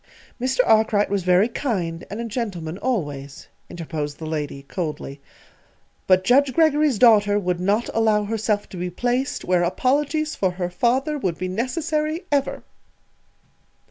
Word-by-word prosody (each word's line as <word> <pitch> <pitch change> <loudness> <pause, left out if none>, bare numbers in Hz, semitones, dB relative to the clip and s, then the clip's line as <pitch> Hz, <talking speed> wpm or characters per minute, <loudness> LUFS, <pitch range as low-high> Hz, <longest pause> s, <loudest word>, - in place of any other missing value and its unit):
"Mr. 260 0 +2
Arkwright 215 -2 +3
was 200 -1 +1
very 180 +3 +4
kind, 185 -10 -3
and 205 - -6
a 235 - -3
gentleman, 195 -7 -4
always," 145 - -3 0.2
interposed 155 -3 -5
the 160 - -7
lady, 150 -3 -4
coldly; 150 -3 -5 0.9
"but 185 0 +4
Judge 265 +6 +4
Greggory's 305 -5 +3
daughter 205 -3 +5
would 180 -3 -1
not 205 +5 +1
allow 220 -2 +2
herself 210 0 -1
to 185 - -9
be 180 +1 -3
placed 245 +8 -2
where 180 -1 +2
apologies 290 - 0
for 190 - +1
her 180 -1 -3
father 265 - 0
would 180 -9 -2
be 185 - -3
necessary 305 - -2
_ever! 280 -1 0
205 Hz, 140 wpm, -22 LUFS, 175-255 Hz, 0.9 s, daughter